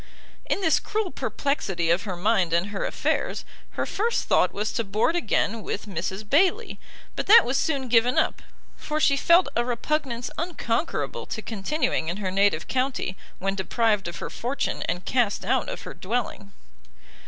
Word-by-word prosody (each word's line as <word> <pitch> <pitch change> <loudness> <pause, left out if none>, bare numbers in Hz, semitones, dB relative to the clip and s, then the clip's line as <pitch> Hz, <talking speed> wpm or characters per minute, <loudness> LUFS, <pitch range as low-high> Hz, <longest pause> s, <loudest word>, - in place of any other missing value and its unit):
In - - 0
this 325 -4 +3
cruel 420 -3 -2
perplexity 190 - -1
of 180 +6 +1
her 190 -3 -3
mind 185 -3 +2
and 170 +4 +1
her 205 -1 -3
affairs, - - -1 0.3
her - - 0
first 460 +4 0
thought - - +3
was 210 +1 -2
to 230 - 0
board 215 - +1
again 225 -7 0
with 205 - -4
Mrs 190 +2 -4
Bayley; 380 - +2 0.4
but - - -3
that 445 +4 +9
was 250 +3 -1
soon 275 -2 0
given 240 +1 +3
up, - - +1 0.3
for 305 0 -3
she 280 -2 +4
felt 340 +5 +5
a 235 - +2
repugnance 245 0 -2
unconquerable 320 -4 -2
to 220 - -5
continuing 220 - -1
in 170 +3 -2
her 195 -3 -3
native 195 -4 +2
county, 255 -7 -1 0.2
when 195 +1 -1
deprived 210 +1 0
of 175 - -6
her - - -6
fortune, 255 +4 -2
and 175 +2 -3
cast 230 -7 +1
out 255 +4 +1
of - - -6
her - - -7
dwelling. 200 -1 -3
230 Hz, 170 wpm, -25 LUFS, 195-280 Hz, 0.4 s, that